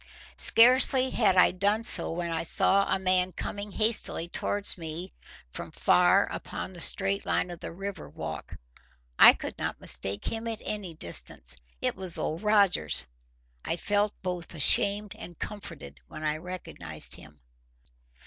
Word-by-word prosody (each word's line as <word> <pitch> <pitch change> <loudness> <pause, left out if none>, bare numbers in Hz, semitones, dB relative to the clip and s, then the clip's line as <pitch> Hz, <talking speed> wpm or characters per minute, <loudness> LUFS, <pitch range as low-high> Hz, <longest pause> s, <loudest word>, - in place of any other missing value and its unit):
Scarcely 255 +2 +5
had 200 -5 +1
I 180 - +5
done 205 +4 -1
so, - - +4
when 170 0 -4
I 165 - -2
saw 195 +4 +2
a - - +2
man 185 -1 -1
coming 205 +1 -6
hastily 215 -5 -1
towards 205 +3 +4
me 165 +2 -7 0.4
from - - -8
far - - +3
upon - - -7
the 175 - -12
straight 195 +3 +3
line 180 - -2
of 175 - -10
the - - -8
river 195 +3 -8
walk. 80 +1 -8 0.6
I - - +9
could - - -8
not - - -4
mistake 100 +1 -2
him 225 +1 -4
at 225 -2 -6
any 200 -6 -5
distance. 65 - -2 0.2
It - - -2
was 185 -2 -1
Old 160 +3 -4
Rogers. 200 - +2 0.6
I - - -3
felt 205 +2 -1
both 180 -2 -6
ashamed 200 +7 +3
and 175 -6 -11
comforted 75 - -9
when 155 - -10
I 155 0 -2
recognized 155 - -2
him. 75 +1 -10
185 Hz, 150 wpm, -27 LUFS, 160-205 Hz, 0.6 s, I